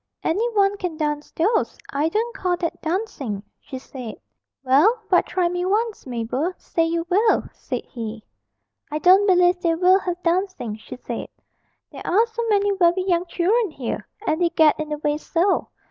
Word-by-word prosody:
'Any 430 Hz, +9 st, +1 dB
one 400 Hz, 0 st, +3 dB
can 360 Hz, -5 st, -4 dB
dance 295 Hz, -1 st, -2 dB
those. 425 Hz, +8 st, +1 dB
I 295 Hz, +3 st, +1 dB
don't 460 Hz, +6 st, -1 dB
call 360 Hz, -1 st, 0 dB
that 335 Hz, -2 st, -3 dB
dancing,' 315 Hz, -, -3 dB, 0.2 s
she 265 Hz, -, -8 dB
said. 255 Hz, -3 st, -8 dB, 0.5 s
'Well, 300 Hz, -, +4 dB
but 355 Hz, -, +4 dB
try 360 Hz, -2 st, +1 dB
me 355 Hz, +1 st, -2 dB
once, 425 Hz, -, -1 dB
Mabel; 250 Hz, +8 st, -2 dB
say 330 Hz, -, -1 dB
you 335 Hz, 0 st, -1 dB
will,' 415 Hz, +5 st, +3 dB
said -, -, -5 dB
he. 225 Hz, -3 st, -7 dB, 0.7 s
'I 300 Hz, -, -1 dB
don't 375 Hz, +5 st, +5 dB
believe 360 Hz, -1 st, +4 dB
they 335 Hz, -1 st, +2 dB
will 365 Hz, +3 st, +5 dB
have 355 Hz, -2 st, -4 dB
dancing,' 345 Hz, -, -1 dB
she 220 Hz, -, -10 dB
said; 240 Hz, -2 st, -5 dB, 0.6 s
'there -, -, -9 dB
are 425 Hz, +6 st, +4 dB
so 465 Hz, 0 st, -5 dB
many 405 Hz, -1 st, +3 dB
very 350 Hz, 0 st, +3 dB
young 355 Hz, -1 st, +1 dB
children 400 Hz, +6 st, +1 dB
here 270 Hz, -7 st, -5 dB, 0.2 s
and 315 Hz, +3 st, 0 dB
they 345 Hz, -, +3 dB
get 315 Hz, -3 st, +4 dB
in 310 Hz, 0 st, -3 dB
the 300 Hz, -, -2 dB
way 295 Hz, 0 st, 0 dB
so. 350 Hz, +5 st, +1 dB
350 Hz, 175 wpm, -22 LUFS, 300-390 Hz, 0.7 s, don't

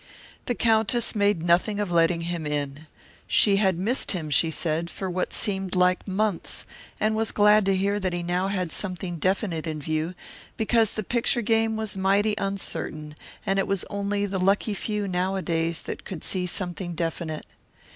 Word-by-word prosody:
The 245 Hz, -, 0 dB
Countess 225 Hz, +1 st, +2 dB
made 205 Hz, -5 st, +2 dB
nothing 180 Hz, +5 st, +2 dB
of 205 Hz, -3 st, -1 dB
letting 170 Hz, 0 st, +3 dB
him 170 Hz, -2 st, -3 dB
in. 145 Hz, +1 st, -3 dB, 0.4 s
She 200 Hz, -2 st, +4 dB
had 190 Hz, -4 st, +2 dB
missed 220 Hz, +8 st, +1 dB
him, 160 Hz, -5 st, -4 dB
she 160 Hz, +4 st, +3 dB
said, 165 Hz, +1 st, -1 dB
for 190 Hz, -, -5 dB
what 180 Hz, +1 st, -1 dB
seemed 195 Hz, -3 st, 0 dB
like 180 Hz, +1 st, +2 dB
months, 200 Hz, -1 st, -1 dB, 0.3 s
and 215 Hz, 0 st, +2 dB
was 225 Hz, 0 st, +1 dB
glad 210 Hz, -1 st, +5 dB
to 195 Hz, -, +3 dB
hear 200 Hz, +2 st, +1 dB
that 190 Hz, -2 st, -1 dB
he 175 Hz, 0 st, -3 dB
now 180 Hz, +2 st, 0 dB
had 185 Hz, -4 st, -2 dB
something 180 Hz, -2 st, -3 dB
definite 185 Hz, -2 st, 0 dB
in 155 Hz, -1 st, -3 dB
view, 155 Hz, +4 st, -2 dB, 0.4 s
because 225 Hz, -1 st, +2 dB
the 215 Hz, -, -3 dB
picture 235 Hz, +2 st, +1 dB
game 225 Hz, 0 st, +2 dB
was 220 Hz, -2 st, -2 dB
mighty 200 Hz, +3 st, +2 dB
uncertain 155 Hz, -6 st, -3 dB, 0.3 s
and 195 Hz, 0 st, +1 dB
it 195 Hz, -, 0 dB
was 195 Hz, -2 st, 0 dB
only 200 Hz, 0 st, -1 dB
the 195 Hz, -1 st, -2 dB
lucky 200 Hz, +3 st, +2 dB
few 210 Hz, 0 st, -2 dB
nowadays 180 Hz, -3 st, -1 dB
that -, -, -6 dB
could 180 Hz, -5 st, -7 dB
see 180 Hz, -1 st, -2 dB
something 175 Hz, -1 st, -4 dB
definite. 165 Hz, -1 st, -3 dB
190 Hz, 175 wpm, -26 LUFS, 170-205 Hz, 0.4 s, glad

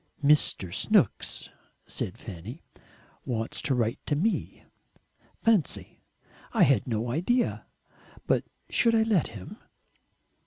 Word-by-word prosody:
"Mr. 140 Hz, -, +3 dB
Snooks," -, -, +1 dB, 0.4 s
said -, -, -4 dB
Fanny, 105 Hz, -, -9 dB, 0.6 s
"wants 115 Hz, -2 st, -2 dB
to 135 Hz, -, 0 dB
write 115 Hz, -2 st, 0 dB
to 145 Hz, -, +1 dB
me. 210 Hz, +10 st, -1 dB, 0.8 s
Fancy! 215 Hz, -10 st, +1 dB, 0.5 s
I -, -, +5 dB
had 135 Hz, -5 st, +3 dB
no 115 Hz, 0 st, -1 dB
idea. 235 Hz, -, 0 dB, 0.6 s
But -, -, +2 dB, 0.2 s
should 230 Hz, -1 st, +3 dB
I 220 Hz, -, +4 dB
let 215 Hz, -7 st, +2 dB
him?" 95 Hz, -, -10 dB
140 Hz, 110 wpm, -28 LUFS, -, 0.8 s, I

